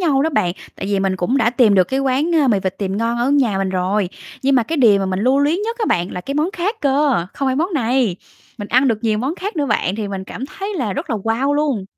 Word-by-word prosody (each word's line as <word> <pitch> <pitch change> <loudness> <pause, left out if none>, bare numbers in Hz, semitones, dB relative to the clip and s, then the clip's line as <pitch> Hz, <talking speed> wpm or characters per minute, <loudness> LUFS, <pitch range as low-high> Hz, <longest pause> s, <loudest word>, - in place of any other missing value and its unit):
nhau 290 -6 +2
đó 320 - +1
bạn, 180 - +1 0.2
tại - - -5
vì 200 -1 0
mình 190 -1 0
cũng 185 +9 0
đã 230 -4 +3
tìm 240 -4 +4
được 185 -2 +5
cái, 265 +9 -2
ơ, - - 0
quán 270 +5 +1 0.2
mì 205 - +3
vịt 190 -1 -3
tiềm 195 -1 -2
ngon 230 +2 -1
ở 245 +3 +1
nhà 255 -9 +2
mình 195 0 0
rồi. 190 +1 0 0.3
Nhưng 275 +1 +3
mà 250 - +4
cái 320 +9 -3
điều 225 -8 +5
mà 195 - -1
mình 190 +1 -2
lưu 260 +4 +3
luyến 305 +7 +1
nhất 460 +3 -3
á 440 - 0
bạn 175 +1 0
là 180 - -4
cái 275 +9 -5
món 305 +5 +1
khác 410 +4 -2
cơ, 275 - +2
không 275 - -1
phải 260 - 0
món 345 +5 0
này, 245 - +1 0.4
mình 205 -1 -6
ăn 260 +3 +3
được 225 -3 +1
nhiều 215 -2 +1
món 265 +8 -2
khác 390 0 -5
nữa 290 - 0
bạn, 190 -6 0
thì 215 -2 -3
mình 195 -1 -5
cảm 255 +7 -7
thấy 395 +7 -6
là 245 - -2
rất - - -5
là 225 - 0
wow 225 +7 0
luôn. 290 -9 0
250 Hz, 290 wpm, -19 LUFS, 200-285 Hz, 0.4 s, được